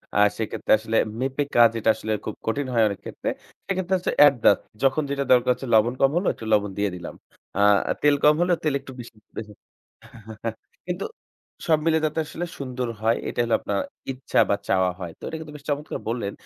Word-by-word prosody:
আর 105 0 +6
সেক্ষেত্রে 110 -2 -3
আসলে 110 +1 -1 0.2
মেপে 135 +2 0
কাজ 120 -1 +8
যেটা 115 -1 +1
আসলে 110 - -5
খুব 110 - -4
কঠিন 140 +4 -1
হয় 115 -2 +4
অনেক 100 -2 -4
ক্ষেত্রে। - - -4 0.4
সেক্ষেত্রে 190 -1 0
হচ্ছে 180 - -2
অ্যাডজাস্ট 135 -8 +6 0.2
যখন 135 +3 +3
যেটা 140 0 -1
দরকার 125 0 +4
হচ্ছে, 135 - -8
লবণ 115 +3 +4
কম 135 0 +5
হলো 180 - 0
একটু 115 - -10
লবণ 105 -1 +2
দিয়ে 100 0 +1
দিলাম। 85 -1 -7 0.4
আ - - 0 0.4
তেল 145 -1 +5
কম 150 - +7
হলেও 175 -1 +2
তেল 155 -3 +1
একটু 135 -1 -11
বেশ, 120 - -8 0.3
বেশি 105 -1 -6 1.3
কিন্তু 180 +2 -3 0.6
সব 160 -2 +5
মিলে 160 -1 +3
যাতে 155 +1 -1
আসলে 175 +3 -5
সুন্দর 130 -2 -3
হয়। 115 +1 +2
এটা - - -5
হলো 115 -1 -1
আপনার - - -2 0.3
ইচ্ছা 130 0 -1
বা - - +4
চাওয়া 95 -1 +2
হয়। 90 -3 -5
তো - - -56
এটা 160 - -4
কিন্তু 155 -2 -9
বেশ 145 - -11
চমৎকার 145 +1 -2
বললেন, 115 -4 -2
130 Hz, 195 wpm, -24 LUFS, 110-150 Hz, 1.3 s, কাজ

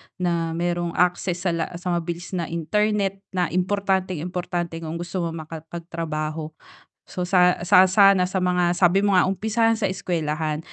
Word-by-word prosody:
na 170 -2 -1
merong 175 0 -2
access 180 0 0
sa 180 - +1
la 165 -1 -1
sa 180 +1 -3
mabilis 170 0 -3
na 175 -4 -2
internet 195 +4 0 0.2
na 180 -3 0
importanteng-importante 180 -3 -1
kung 165 0 -5
gusto 175 +2 -4
mong 165 -1 -2
makapagtrabaho. 160 -1 -5 0.6
So 180 - -4
sa, 180 -1 +4
sa 185 +1 +6
sana 195 -1 +5
sa 190 +1 -2
mga 180 -1 +2
sabi 175 +1 +4
mo 200 -1 +2
nga 180 - +5
umpisahan 220 +3 +1
sa 205 - +1
eskuwelahan, 160 -5 -2
175 Hz, 150 wpm, -23 LUFS, 165-185 Hz, 0.6 s, sa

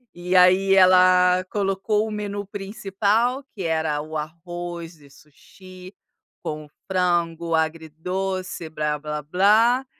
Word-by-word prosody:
E 175 +1 -4
aí, 185 +1 +5
ela 185 -1 +5
colocou 205 +2 -1
o - - -6
menu 205 -1 -4
principal 205 +5 -1
que 195 -5 -6
era 160 -2 -1
o 155 +1 -9
arroz 170 +2 -7
e 140 - -18
sushi 185 +6 -15 0.5
com 150 0 -6 0.2
frango 170 -2 0
agridoce, 165 +3 -3
"blá-blá-blá" 155 - +1
180 Hz, 100 wpm, -23 LUFS, 160-195 Hz, 0.5 s, aí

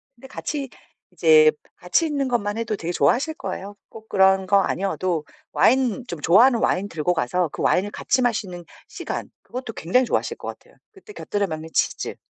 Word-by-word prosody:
근데 255 +3 -14
같이 275 0 -5 0.4
이제 155 -3 +6 0.2
같이 180 - +1
있는 285 -3 -1
것만 215 -4 -1
해도 225 -2 -2
되게 170 -3 -4
좋아하실 190 - +1
거예요. 195 -1 -6
꼭 220 0 -14
그런 190 -1 +3
거 200 0 +4
아니어도 185 -5 -2 0.3
와인 255 -1 +2
좀 170 - -6
좋아하는 230 - +5
와인 200 -1 0
들고 165 +1 -1
가서 170 +3 0
그 - - -7
와인을 200 +3 +1
같이 255 - 0
마시는 190 -7 -2 0.2
시간 - - -6
그것도 250 -3 -7
굉장히 250 +10 +1
좋아하실 - - -1
것 - - -9
같아요. - - -10 0.2
그때 420 0 -15
곁들여 205 - -2
먹는 160 -1 -6
치즈. - - -1
200 Hz, 380 characters per minute, -23 LUFS, 175-250 Hz, 0.4 s, 이제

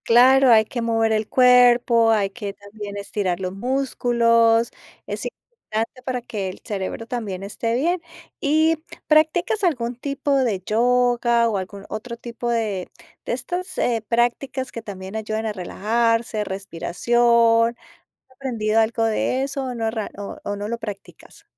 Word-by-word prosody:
Claro, 260 +3 +6
hay 220 -1 +6
que 240 +2 -4
mover 225 -1 +1
el 215 -1 0
cuerpo, 245 -2 +5
hay 205 -3 +1
que 200 -2 -6
también 205 0 -9
estirar 195 -3 -2
los 185 -1 -3
músculos. 235 -1 +2 0.3
Es - - -5
importante 255 - -6
para 255 -1 -2
que 210 -6 -4
el 185 - -9
cerebro 200 +2 -4
también, 215 -7 -4
esté 230 +3 -2
bien. 335 +7 0 0.4
Y, 315 +2 +3 0.3
¿practicas 320 +7 +2
algún 250 -9 0
tipo 280 +2 -1
de 235 -8 +1
yoga?, 240 0 +3
o 210 - -1
algún 195 +1 -7
otro 235 +2 -6
tipo 240 0 -5
de 215 -6 -1 0.4
de - - -2
estas, 355 +9 -4
eh, 230 -3 0
prácticas 245 +3 0
que 230 - -6
también 195 -1 -8
ayudan 220 0 -3
a 215 - -2
relajarse, 225 +3 0
respiración. 230 +5 +2 0.3
¿Has - - -56
aprendido 225 -5 0
algo 225 0 +1
de 225 +4 0
eso, 275 0 -3
o 255 -1 -4
no 225 -1 -1
rea 220 -2 -4
o 205 - -7
o 205 - -3
no 205 +1 -4
lo 235 +1 -3
practicas? 210 -4 -10
230 Hz, 155 wpm, -22 LUFS, 215-250 Hz, 0.4 s, Claro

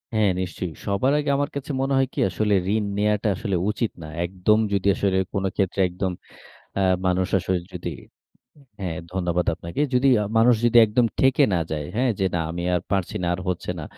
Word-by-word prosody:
হ্যাঁ, 105 -3 +3
নিশ্চয়ই। 90 -2 -4
সবার 110 +8 +1
আগে 145 -1 -2
আমার 145 0 0
কাছে 140 +1 -4
মনে 135 0 0
হয় 135 -1 +3
কি? - - -4
আসলে, 105 +3 0 0.2
ঋণ 105 -2 0
নেয়াটা 105 0 +1
আসলে 100 -1 -2
উচিত 110 +1 -1
না। 80 - -7 0.2
একদম 95 +4 +2 0.2
যদি 100 0 0
আসলে 95 0 +1 0.2
কোন 95 -1 -1
ক্ষেত্রে 95 0 -1
একদম, 90 +1 -2 0.7
আ - - +2 0.2
মানুষ 90 0 +2 0.5
যদি 85 -2 -5 0.9
হ্যাঁ, 85 -4 -3 0.2
ধন্যবাদ 90 -1 0
আপনাকে। 85 +10 -4
যদি 130 +2 +4
আ - - 0
মানুষ 120 +1 +5
যদি 120 0 +4
একদম 115 +3 +2
ঠেকে 135 -1 +4
না 85 - +2
যায়, 75 -1 -2
হ্যাঁ? 125 0 +2
যে 95 - +2
না, - - 0
আমি 85 +1 -4
আর 90 - +1
পারছি 95 -3 -1
না, - - 0
আর 90 - -4
হচ্ছে 90 0 -2
না। - - -5
100 Hz, 195 wpm, -23 LUFS, 90-115 Hz, 0.9 s, মানুষ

